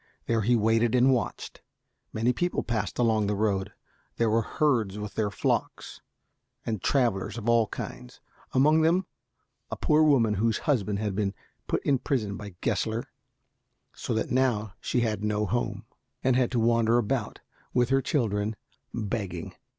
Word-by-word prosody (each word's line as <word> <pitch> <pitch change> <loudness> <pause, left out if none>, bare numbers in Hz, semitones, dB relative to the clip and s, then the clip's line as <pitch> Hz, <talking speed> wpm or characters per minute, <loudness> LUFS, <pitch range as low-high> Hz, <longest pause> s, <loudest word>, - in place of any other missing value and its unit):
There 115 -1 +1
he 120 +4 +3
waited 115 +1 +2
and 130 +2 +5
watched. 125 - -3 0.5
Many 115 +3 +1
people 175 +7 -1
passed 115 -2 -2
along 110 -4 +2
the 105 - 0
road. 100 -1 0 0.5
There 115 -2 +2
were 115 +1 +3
herds 115 -6 0
with 105 0 -6
their 110 -2 0
flocks, 100 - -2 0.6
and 110 -5 -2
travelers 110 -6 +1
of 115 -1 -6
all 115 -2 +4
kinds, 60 - -8 0.3
among 150 +4 +4
them 175 +4 +3 0.6
a - - -3
poor 150 +1 +3
woman 135 -8 +4
whose 115 -1 +2
husband 105 -9 0
had 105 -1 -2
been 100 -1 -1 0.3
put - - -1
in 135 -2 +3
prison 110 -9 -1
by 100 -3 -9
Gessler, 110 +1 -1 0.9
so 115 - -3
that 110 - -1
now 120 -6 +1
she 125 - 0
had 110 -3 -1
no 105 0 0
home, 110 -2 -2 0.4
and 130 -1 +3
had 125 -2 +2
to 120 - +2
wander 115 0 +3
about 110 -4 -1 0.3
with 120 -1 +2
her 135 0 +3
children 110 -6 0 0.4
begging. 100 -6 -4
115 Hz, 160 wpm, -27 LUFS, 105-125 Hz, 0.9 s, and